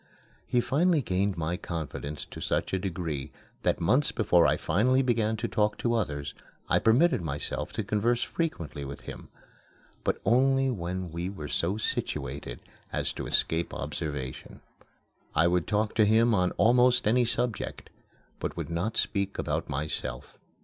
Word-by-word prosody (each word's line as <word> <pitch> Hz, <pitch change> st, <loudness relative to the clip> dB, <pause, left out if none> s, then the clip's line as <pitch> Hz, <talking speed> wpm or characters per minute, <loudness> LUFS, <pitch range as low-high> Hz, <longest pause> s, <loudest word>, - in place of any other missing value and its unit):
He 120 Hz, -, +2 dB
finally 160 Hz, +3 st, +2 dB
gained 95 Hz, 0 st, 0 dB
my 85 Hz, +2 st, -1 dB
confidence 75 Hz, -3 st, -5 dB
to -, -, -10 dB
such -, -, -1 dB
a 95 Hz, -, +2 dB
degree 80 Hz, -6 st, -3 dB, 0.3 s
that -, -, +1 dB
months 125 Hz, -, +3 dB
before 90 Hz, -6 st, +4 dB
I -, -, +2 dB
finally 125 Hz, +10 st, +2 dB
began 110 Hz, -3 st, +1 dB
to 115 Hz, -, -2 dB
talk 105 Hz, -2 st, +1 dB
to 120 Hz, -, 0 dB
others 75 Hz, -11 st, -2 dB, 0.3 s
I -, -, +3 dB
permitted 130 Hz, -, +4 dB
myself 75 Hz, -3 st, -3 dB
to -, -, -2 dB
converse 115 Hz, +3 st, +1 dB
frequently 85 Hz, -, -3 dB
with 70 Hz, 0 st, -7 dB
him -, -, -9 dB, 0.7 s
but -, -, 0 dB
only 135 Hz, +2 st, +4 dB
when 90 Hz, -4 st, -4 dB
we 85 Hz, +3 st, -3 dB
were 80 Hz, -7 st, -6 dB
so 90 Hz, +7 st, 0 dB
situated 70 Hz, -, -3 dB, 0.3 s
as -, -, -1 dB
to -, -, -5 dB
escape 80 Hz, +1 st, 0 dB
observation. 70 Hz, -4 st, -5 dB, 0.7 s
I 80 Hz, -, +5 dB
would 90 Hz, -2 st, +1 dB
talk 105 Hz, 0 st, +1 dB
to 110 Hz, -, +4 dB
him 115 Hz, +2 st, +4 dB
on 90 Hz, -3 st, +3 dB
almost 125 Hz, +2 st, +4 dB
any 120 Hz, +3 st, +4 dB
subject, 120 Hz, -1 st, -2 dB, 0.5 s
but -, -, -4 dB
would -, -, -4 dB
not 90 Hz, +7 st, -1 dB
speak 100 Hz, -1 st, 0 dB
about -, -, -2 dB
myself. 70 Hz, -4 st, -4 dB
100 Hz, 155 wpm, -28 LUFS, 80-120 Hz, 0.7 s, I